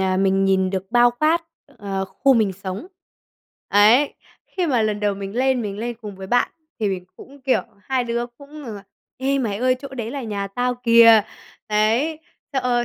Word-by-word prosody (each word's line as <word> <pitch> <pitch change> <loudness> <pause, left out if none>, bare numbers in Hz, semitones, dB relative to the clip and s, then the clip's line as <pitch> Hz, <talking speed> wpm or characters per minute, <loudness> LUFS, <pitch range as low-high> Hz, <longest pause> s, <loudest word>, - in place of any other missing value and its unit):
à, 190 -1 +1
mình 195 0 +2
nhìn 190 -1 +2
được 190 -1 -3
bao 240 0 +5
quát, 310 +7 +1 0.4
ờ, 195 -1 -3
khu 265 +8 +2
mình 215 -4 +2
sống. 190 - -6 0.8
Ấy, 220 +8 +5 0.3
khi 365 -3 -2
mà 250 -6 +2
lần 210 -1 -1
đầu 205 -1 +1
mình 195 +3 -7
lên 260 -1 +2
mình 205 -1 -5
lên 235 0 -4
cùng 205 -3 -8
với 190 - -8
bạn 245 +5 +2 0.3
thì 210 - +1
mình 185 -2 -3
cũng, 280 +2 -14
kiểu 265 -1 +2 0.2
hai 260 0 -1
đứa 235 0 -2
cũng 280 +5 -13
rằng 220 -3 -6
là 200 - -11 0.4
"Ê, 275 +1 0
mày 215 -6 -1
ơi 255 +2 +2
chỗ 275 - -7
đấy 240 -4 -5
là 275 -1 -5
nhà 205 -3 -3
tao 245 +5 -1
kìa!" 230 -2 +6 0.5
Đấy, 225 +9 +1 0.3
thế, 270 - 0
ơ, 240 -1 +1
230 Hz, 200 wpm, -22 LUFS, 200-255 Hz, 0.8 s, kìa